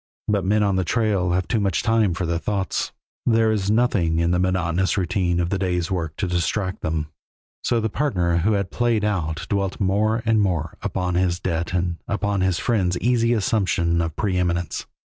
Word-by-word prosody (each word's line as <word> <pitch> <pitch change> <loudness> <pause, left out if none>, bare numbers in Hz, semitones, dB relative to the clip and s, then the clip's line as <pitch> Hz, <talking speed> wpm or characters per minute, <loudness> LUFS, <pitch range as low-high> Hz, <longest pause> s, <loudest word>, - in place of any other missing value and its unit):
But 105 -2 +1
men 105 +3 +2
on 100 -2 +1
the 95 - +1
trail 100 -3 +1
have 90 0 0
too 110 - +1
much 100 -4 0
time 110 -6 +2
for 90 - -2
their 85 0 -1
thoughts; 100 0 -2 0.3
there 115 -1 +3
is 100 -2 0
nothing 105 -8 +2
in 85 +1 +2
the 90 - +2
monotonous 95 0 +1
routine 90 -1 0
of 85 +1 -1
the 100 - 0
day's 90 -2 -1
work 80 -4 -2
to 100 - -2
distract 90 +3 -1
them, 80 -1 -2 0.5
so 120 - +1
the 110 - 0
partner 90 - 0
who 100 +6 +2
had 100 -2 -1
played 120 -3 +1
out 80 -6 -2
dwelt 100 -2 -1
more 105 +4 +1
and 110 -1 +3
more 85 -5 -1
upon 90 -1 -2
his 90 0 +1
debt 85 -2 -2
and 90 -1 0
upon 100 -1 -1
his 95 -2 +1
friend's 95 -6 +1
easy 120 0 +2
assumption 95 -6 +1
of 80 -2 -3
preëminence. 90 -4 -1
95 Hz, 190 wpm, -23 LUFS, 85-105 Hz, 0.5 s, there